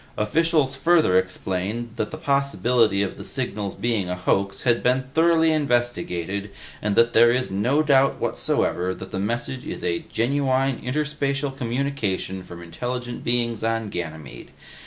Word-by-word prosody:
Officials 150 +5 +2
further 160 - +3
explained 95 +5 -1
that 105 - -1
the 155 - -7
possibility 125 -8 +2
of 95 - -4
the - - -8
signal's 100 -1 -3
being 110 -6 -1
a 90 - -1
hoax 100 +2 0
has 120 -2 +3
been 130 +1 +2
thoroughly 165 0 +4
investigated 120 - -1 0.3
and 105 -1 0
that 115 0 +4
there 115 +1 +7
is 125 -2 -1
no 125 +10 +2
doubt 135 -2 +4
whatsoever 90 +1 0
that 95 - -9
the 95 - -3
message 120 +5 -2
is - - -6
a 85 -1 0
genuine 135 +1 +1
interspatial 140 0 -2
communication 120 -7 -2
from 85 -1 -10
intelligent 120 +8 -5
beings 120 -2 0
on 115 -1 -1
Ganymede. 80 -6 -7
120 Hz, 145 wpm, -23 LUFS, 100-135 Hz, 0.3 s, there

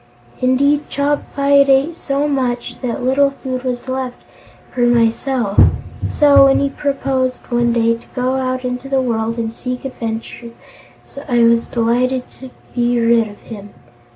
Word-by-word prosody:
Indeed, 280 +3 +2
Chopfyt 280 -1 +1
ate 275 +5 +3
so 280 -3 -1
much 255 -4 -2
that 245 -1 -3
little 275 +2 +3
food 260 -2 -5
was 250 -1 -4
left 260 -1 -4 0.6
for 250 - -2
myself; 235 -1 +1 0.5
so, 285 -2 +5
when 270 - +4
he 280 - +1
proposed, 270 -2 -2
one 240 0 +2
day, 230 -1 +2
to 230 - -15
go 255 +1 0
out 255 -1 -2
into 250 +2 -4
the 270 -1 +1
world 230 -2 -1
and 225 -1 -3
seek 250 +2 -6
adventures, 230 -1 -6 0.8
I 240 -1 +3
was 230 0 +3
delighted 250 +2 0
to 260 - -9 0.2
be 240 0 +1
rid 230 -1 +3
of 205 -1 -12
him. 205 -3 -11
255 Hz, 150 wpm, -17 LUFS, 235-270 Hz, 0.8 s, so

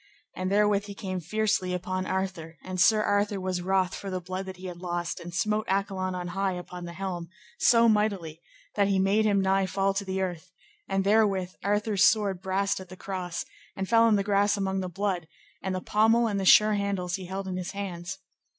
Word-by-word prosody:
And 185 +1 -2
therewith 205 0 +3
he 200 -1 -8
came 185 -3 -4
fiercely 185 0 0
upon 185 +1 -3
Arthur, 185 -4 -3
and 185 -1 -2
Sir 215 +3 +5
Arthur 205 0 +1
was 185 -1 -2
wroth 185 0 +1
for 195 - -6
the 185 -1 -2
blood 185 +2 -5
that 190 -1 -7
he 185 - -10
had 180 -2 -6
lost, 175 -1 -3
and 175 - -8
smote 215 +3 0
Accolon 190 -1 -1
on 180 -1 -4
high 195 +1 -1
upon 180 0 -7
the 170 - -7
helm, 175 -2 -5 0.3
so 235 -1 +5
mightily, 200 -7 0 0.3
that 200 - +2
he 195 -1 +2
made 195 +3 +3
him 200 -2 +3
nigh 190 0 +2
to - - -9
fall 195 0 +1
to 200 +1 -2
the 190 0 -3
earth; 180 -2 -3 0.4
and 195 0 +1
therewith 200 -3 +2
Arthur's 205 0 +1
sword 200 -4 +3
brast 195 +1 0
at 185 -1 -10
the 185 - -10
cross, 185 -3 -4 0.3
and 190 0 -3
fell 230 +1 +5
in 220 - +4
the 200 - +1
grass 205 0 +2
among 190 -1 -1
the 185 -1 -3
blood, 185 -2 -2 0.3
and 190 -1 -2
the 185 - -3
pommel 225 +4 +3
and 205 -2 -1
the 190 - -2
sure 215 +3 +7
handles 200 -3 -1
he 185 -2 -8
held 190 +1 -4
in 185 -1 -3
his 180 +1 -5
hands. 195 -2 -5
190 Hz, 215 wpm, -27 LUFS, 185-200 Hz, 0.4 s, sure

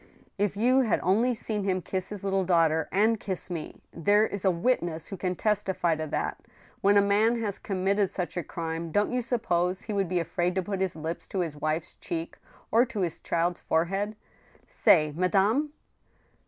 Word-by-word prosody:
" - - -36
If 200 - -15
you 250 +5 +4
had 235 -7 +2
only 230 +7 +2
seen 215 -2 -3
him 185 -2 0
kiss 185 -1 -3
his 205 -2 -7
little 195 -1 +1
daughter 165 -3 +2
and 215 +3 +3
kiss 190 -2 -4
me! 165 -3 -6
There 205 +6 +3
is 200 -3 -5
a 195 - +4
witness 175 -4 0
who 195 - -5
can 185 -1 -2
testify 190 -5 0
to 155 0 -4
that!... - - -2 0.4
When 200 +1 +5
a 200 - +6
man 215 +4 +3
has 210 -3 -2
committed 195 0 0
such 180 -4 -4
a 175 - -1
crime, 165 0 -5
don't 205 +5 +1
you 250 - +1
suppose 185 -7 0
he 215 - -4
would 195 -3 0
be 180 -1 +1
afraid 175 +1 -1
to 190 - 0
put 195 +1 -3
his 190 -4 -1
lips 160 +2 -5
to 190 - -2
his 165 -4 -3
wife's 155 +3 -3
cheek 165 -1 -5 0.3
or 230 +2 +5
to 220 -5 -4
his 170 -4 -2
child's 170 +1 -1
forehead? 195 +6 0 0.5
Say, 155 -3 +4
madame 200 - +2
190 Hz, 195 wpm, -28 LUFS, 170-205 Hz, 0.5 s, a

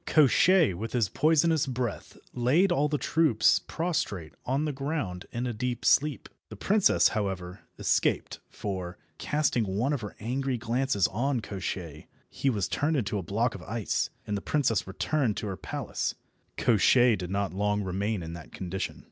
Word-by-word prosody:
Koshchei 160 - +5
with 110 +6 -6
his 115 -6 +1
poisonous 160 - +3
breath 125 -4 -4 0.2
laid 145 +11 +3
all 150 -3 +2
the 150 - 0
troops 155 -8 +3
prostrate 150 - -3
on 135 +4 +1
the 150 - -1
ground 135 - -3
in 120 +1 -3
a 120 - -2
deep 120 +2 -3
sleep. 150 -2 +3 0.2
The 110 - -8
princess, 200 - +3
however, 95 -3 -3 0.2
escaped, - - 0
for, 95 -4 -5 0.2
casting 145 -6 +1
one 130 +7 +1
of 140 - -2
her 105 - -7
angry 130 +3 -2
glances 120 -3 +1
on 125 +5 0
Koshchei, 90 -7 -5 0.2
he 140 - 0
was 105 -7 0
turned 155 +1 0
into 105 -4 -1
a - - -3
block 110 +7 0
of 95 - -8
ice, 110 +3 -2 0.2
and 105 - -2
the 100 - -3
princess 120 -10 0
returned 115 +4 0
to - - -3
her 100 -2 -3
palace. - - -3 0.4
Koshchei 120 +2 +4
did 90 -3 -6
not 100 0 -1
long 105 +1 0
remain 100 +1 -2
in 80 0 -6
that 85 -2 -10
condition. 95 0 -4
115 Hz, 165 wpm, -28 LUFS, 100-140 Hz, 0.4 s, Koshchei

